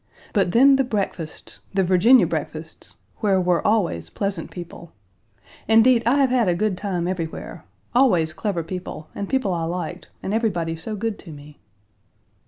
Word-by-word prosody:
But 195 -4 +2
then 270 +5 +6
the 270 - +3
breakfasts 195 -9 -4 0.2
the 195 - +3
Virginia 190 +5 +5
breakfasts 160 -1 -5 0.2
where 200 -4 +2
were 180 -2 +1
always 175 - +1
pleasant 195 - -3
people. 170 -1 -10 0.7
Indeed, 225 +2 +5
I 245 - +4
have 275 -3 +3
had 245 -5 +3
a 175 - +2
good 210 +1 0
time 180 -3 -2
everywhere 170 -3 -5 0.3
always 180 -12 +3
clever 175 -1 -2
people, 165 -2 -7
and 200 - -5
people 260 -8 +1
I 170 - -2
liked, 175 +1 -5
and 195 - -2
everybody 175 -8 0
so 165 +7 -5
good 220 +1 -3
to 170 - -11
me. 145 0 -13
185 Hz, 160 wpm, -23 LUFS, 170-220 Hz, 0.7 s, then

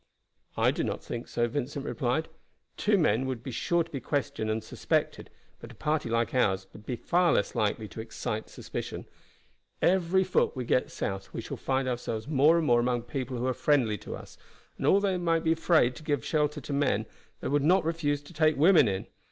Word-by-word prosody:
"I - - +4
do - - -2
not - - -3
think 120 0 -5
so," 120 0 0
Vincent 140 +3 -3
replied. 145 +4 -1 0.5
"Two 210 0 +2
men 130 - +2
would 125 -3 -4
be 130 - -5
sure 170 +8 +1
to - - -17
be 140 - -3
questioned 125 -4 -2
and 110 +1 -1
suspected, - - -1 0.3
but 115 - -10
a - - -17
party 150 -1 -1
like 115 0 0
ours 95 -7 +2
would 105 +1 -14
be 125 - -1
far 175 +7 +2
less 100 - +1
likely 110 -1 0
to 110 - -7
excite 110 -1 -4
suspicion. - - -6 0.7
Every 185 +1 +3
foot 185 - +1
we 125 -2 -3
get 125 - +1
south 95 0 -4
we - - -2
shall - - -6
find 135 0 -1
ourselves 115 -3 -3
more 150 +3 +5
and 165 - +1
more 120 -4 +4
among 120 0 0
people 130 +1 -4
who 120 - -2
are 130 - +1
friendly 120 -6 +2
to - - -7
us, - - -12 0.4
and - - -2
although 200 0 +4
they 185 - 0
might 165 -2 +1
be 160 - +2
afraid 160 -6 +3
to - - -10
give 145 -6 -1
shelter 150 -1 0
to 145 - -5
men, 130 -7 +1 0.3
they - - -4
would 145 +1 +2
not 180 +3 +4
refuse 145 -3 -1
to 160 - -14
take 155 -2 +3
women 160 - +6
in. 95 -2 -2
135 Hz, 210 wpm, -28 LUFS, 120-160 Hz, 0.7 s, women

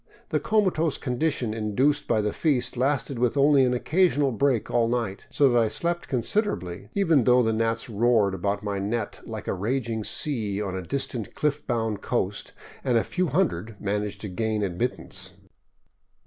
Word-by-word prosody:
The - - +1
comatose 185 -8 +1
condition 125 -3 -1
induced 125 +7 +1
by 110 - +2
the 105 0 -1
feast 125 -6 0
lasted 135 0 0
with 125 +3 +1
only 140 -1 +5
an 125 - +1
occasional 150 -1 +2
break 130 -1 +1
all 120 -1 +3
night, 115 -5 -2
so 140 - +3
that 120 -2 +4
I 115 - +3
slept 170 +8 -2
consider 205 - 0
erably, 90 +2 -8
even 165 -9 +3
though 125 0 +5
the 110 -1 +1
gnats 115 +2 0
roared 110 -3 +2
about 100 +2 -2
my 100 -1 -2
net 105 +2 -3
like - - -7
a - - 0
raging 110 +3 -2
sea 110 -7 -1
on 95 -3 -3
a 95 - -3
distant 120 +2 -3
cliff 150 0 -1
bound 115 -4 -1
coast, - - -2 0.3
and 125 -3 +2
a 115 - +2
few 185 0 -1
hundred 140 - -1
managed 105 0 -2
to 105 - -4
gain 105 +3 -1
admittance. 95 -1 -3
120 Hz, 175 wpm, -26 LUFS, 105-140 Hz, 0.3 s, only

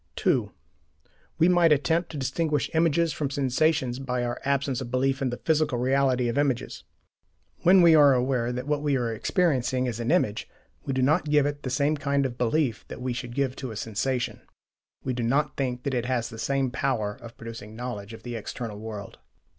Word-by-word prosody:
(2) - - +1 0.9
We 165 - +5
might 175 -2 +5
attempt 160 +4 +2
to 155 - -7
distinguish 145 +2 -1
images 165 0 +2
from 140 -1 -2
sensations 135 -1 +1
by 125 -2 -2
our 120 0 -3
absence 140 -2 0
of 125 - -5
belief 135 +2 0
in 135 - +1
the 120 - -4
"physical 155 -5 +1
reality" 130 0 +2
of 120 +4 0
images. 130 -3 -1 0.8
When 185 +1 +6
we 170 -1 +7
are 145 -3 +7
aware 125 -1 0
that 125 +1 -4
what 145 0 0
we 145 -2 +1
are 120 -2 -1
experiencing 130 - +1
is 120 -2 -3
an 115 - -2
image, 130 - +1 0.3
we 140 - -3
do 130 -1 +1
not 155 +3 +2
give 150 -1 +4
it 145 0 -2
the 140 +3 0
kind 140 -1 +1
of 125 -2 -3
belief 125 -1 +1
that - - -8
we 125 0 -2
should 120 -1 -6
give 135 -2 0
to 130 - -5
a 110 - -7
sensation: 115 +4 -2 0.6
we 130 - -1
do 120 - -3
not 135 +5 +1
think 125 -2 -2
that 140 - -2
it 125 -1 -1
has 125 -3 -1
the 115 -2 -9
same 135 +1 0
power 125 -6 -1
of 115 0 -11
producing 115 -2 -9
knowledge 115 -3 -6
of 115 - -11
the 120 -1 -5
"external 110 -1 -6
world." 105 -2 -8
130 Hz, 200 wpm, -26 LUFS, 120-145 Hz, 0.9 s, we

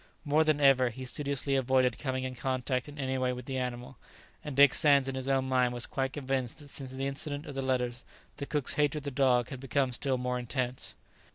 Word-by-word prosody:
More 150 +2 +4
than 155 -2 +2
ever 135 -3 +5
he 130 +3 -8
studiously 140 +1 -1
avoided 130 -2 +2
coming 130 -2 -2
in 130 0 -3
contact 130 +1 -2
in 145 - -11
any 130 -2 -1
way 125 0 +1
with 125 -1 -7
the 130 -1 -3
animal, 125 0 -5 0.4
and 150 -3 -5
Dick 140 -1 +7
Sands 140 -3 +4
in 135 - -2
his 130 0 -3
own 135 -1 +1
mind 125 -1 +2
was 120 - -1
quite 135 -1 -2
convinced 135 -3 -2
that 145 -2 -13
since 135 -2 -3
the 135 +1 -3
incident 145 +2 -3
of 145 - -7
the 135 - -3
letters, 125 -1 -1 0.3
the 140 - -5
cook's 145 -4 0
hatred 150 +1 +1
of - - -17
the 140 - -4
dog 125 -3 +2
had 130 - -6
become 135 0 0
still 130 +1 0
more 125 0 -2
intense. 125 +1 -3
130 Hz, 225 wpm, -30 LUFS, 125-140 Hz, 0.4 s, Dick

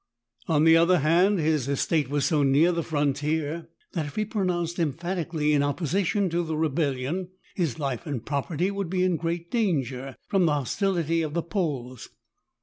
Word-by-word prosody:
On 155 -2 +3
the 160 0 +7
other 170 +2 +5
hand, 175 +7 +3
his 155 -5 +1
estate 140 +1 0
was 145 0 0
so 155 -4 +2
near 145 +5 +4
the 170 -1 -1
frontier 150 +2 -1 0.2
that 160 -4 -2
if 145 - -10
he 215 - 0
pro 210 -1 -2
nounced 175 -1 -1
emphatically 165 -1 -1
in 145 - +3
opposition 180 +7 0
to 170 +1 +1
the 160 -2 -3
rebel 155 -2 +1
lion, 160 +9 -3 0.2
his 165 - -1
life 140 +1 -3
and 130 -6 -4
property 155 +6 -1
would 200 -3 -3
be 185 0 +1
in 185 -2 +2
great 170 +1 -3
dan 195 - +2
ger 130 +1 -7
from 195 -4 +2
the 150 - +2
hostility 165 - 0
of 155 -1 -3
the 170 - 0
Poles. 145 - -3
160 Hz, 185 wpm, -26 LUFS, 145-175 Hz, 0.2 s, the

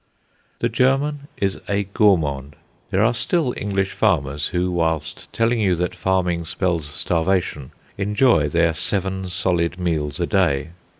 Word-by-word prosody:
The - - +3
German 140 +2 +1
is 95 -1 -1
a 100 0 +1
gourmand. 80 - +1 0.3
There 95 +2 +2
are 115 +2 +3
still 130 +2 0
English 95 -1 -1
farmers 75 -8 0
who, 90 +1 -1
while 80 -2 +1 0.3
telling 115 +1 +1
you 95 -4 +2
that 90 +1 -2
farming 90 -3 0
spells 85 -2 -1
starvation, 80 -2 -1 0.3
enjoy 105 - +3
their 85 +1 +2
seven 95 +2 -2
solid 90 -1 0
meals 80 -5 -1
a - - +1
day. 70 +2 +1
90 Hz, 135 wpm, -21 LUFS, 80-100 Hz, 0.3 s, The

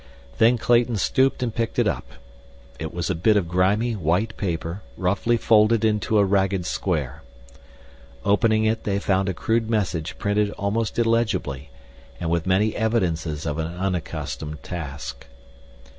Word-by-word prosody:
Then 115 +2 +5
Clayton 120 0 +2
stooped 130 +6 +1
and 115 -3 -2
picked 115 -1 -2
it - - +3
up. - - -2 0.7
It 80 -1 -4
was 85 +1 -2
a - - +2
bit 105 +6 +3
of 95 -4 0
grimy, 100 +7 +2
white 95 +5 0
paper 85 0 -3 0.2
roughly 100 +6 +1
folded 110 0 +4
into 105 0 +1
a 100 - +5
ragged 95 -2 +1
square. 75 -6 -2 1.0
Opening 110 +2 +3
it 110 +1 0
they 100 -1 0
found 95 -1 +1
a - - -1
crude 115 +3 0
message 90 -7 -1
printed 105 0 +1
almost 105 +2 -2
illegibly, 115 - 0 0.5
and 85 -2 -2
with 85 +1 0
many 100 +4 +2
evidences 85 -9 -1
of 75 0 -2
an 80 - -1
unaccustomed 85 -4 -4
task. 75 -5 -6
100 Hz, 145 wpm, -23 LUFS, 85-110 Hz, 1.0 s, Then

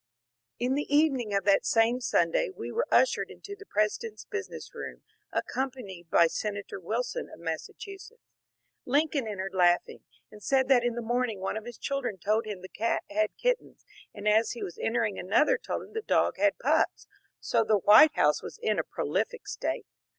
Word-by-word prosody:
'' 120 +1 -59
In 255 - +1
the 285 +1 -2
evening 280 -7 +3
of 200 0 +1
that 200 0 +4
same 230 +2 +2
Sunday - - +1
we 385 - -7
were 475 - -1
ushered - - +3
into 405 - -9
the 400 0 -14
President's 215 - -1
business 410 -3 -6
room, - - -8 0.3
accompanied 235 -11 -4
by 170 - +6
Senator 200 +3 -3
Wil 220 +7 -1
son 250 - -5
of - - -12
Massachusetts. 390 - -7 0.6
Lincoln 285 -1 +1
entered 195 -2 -4
laughing, 175 -1 +2 0.3
and 210 - -13
said 265 +3 +2
that 250 -3 +5
in 240 -1 0
the 240 - -4
morning 240 -2 -1
one 190 - -3
of 220 0 -5
his 240 -1 -8
children 275 -7 -3
told 215 +5 0
him 205 -4 -5
the - - -7
cat 230 +4 -1
had 215 +1 0
kit - - +2
tens, - - -21 0.3
and 205 0 -6
as 220 +2 +3
he 240 - -6
was 175 - -7
entering 225 -3 0
another 205 +11 +3
told - - -4
him - - -15
the 445 - -2
dog - - +1
had - - +2
pups, - - +1 0.3
so 230 -1 +1
the 215 -1 +3
White 215 - +7
House - - +3
was - - -8
in 450 0 0
a - - +1
prolific 485 -1 -3
state. - - -3
230 Hz, 190 wpm, -28 LUFS, 205-285 Hz, 0.6 s, White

